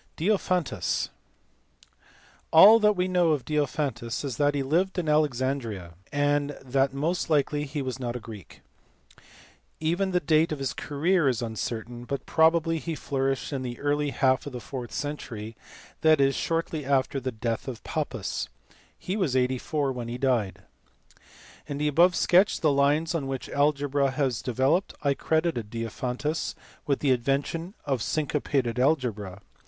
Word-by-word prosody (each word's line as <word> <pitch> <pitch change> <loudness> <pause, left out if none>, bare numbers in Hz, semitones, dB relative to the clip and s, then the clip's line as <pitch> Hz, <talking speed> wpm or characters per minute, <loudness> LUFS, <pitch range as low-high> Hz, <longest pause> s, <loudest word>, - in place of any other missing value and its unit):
Diophantus*. 185 -3 0 1.4
All 205 +8 +9
that 210 -1 +4
we 180 0 0
know 175 -3 +3
of 140 -4 -3
Diophantus 140 -5 -2
is 130 -5 -4
that 145 0 +2
he 140 - 0
lived 175 +8 +1
at 175 -3 -1
Alexandria, 130 - 0 0.2
and 145 0 +1
that 135 +1 +1
most 160 +6 -1
likely 150 -1 +1
he 145 0 -4
was 130 0 -4
not 120 -2 -3
a - - -3
Greek. 110 -4 -11 1.2
Even 175 +5 0
the 180 -1 +2
date 155 +1 +2
of 155 - -2
his 135 -2 -2
career 155 +2 +1
is 120 -2 -1
uncertain, 115 +1 -5
but 135 +1 -4
probably 165 0 +3
he 165 +1 -4
flourished 135 0 -2
in 135 - -2
the 120 -2 -5
early 145 0 0
half 130 0 +1
of 140 - -7
the 125 - -4
fourth 125 -3 -7
century, 115 -6 -5 0.5
that 155 -1 +5
is, 135 0 +4
shortly 165 -1 -2
after 135 0 +1
the 130 -1 -3
death 115 +1 -3
of 125 -4 -6
Pappus. - - -3 0.5
He 185 - -4
was 180 -11 0
84 130 +3 0
when 125 -2 -5
he 120 +1 -4
died. 125 -7 0 1.0
In 145 -2 -4
the 150 +1 0
above 170 +5 +4
sketch 185 +3 +4
of - - -6
the 155 - +4
lines 145 +4 +2
on 150 -5 -2
which 135 -2 -4
algebra 145 -1 +1
has 130 -3 -1
developed 135 - +1
I 140 -1 +3
credited 160 -7 -1
Diophantus 125 +7 -3 0.3
with 140 -2 0
the 140 - +3
invention 140 - -1
of 135 -3 0
synco 150 +2 -1
pated 125 -4 0
algebra. 110 - 0
140 Hz, 160 wpm, -27 LUFS, 125-155 Hz, 1.4 s, All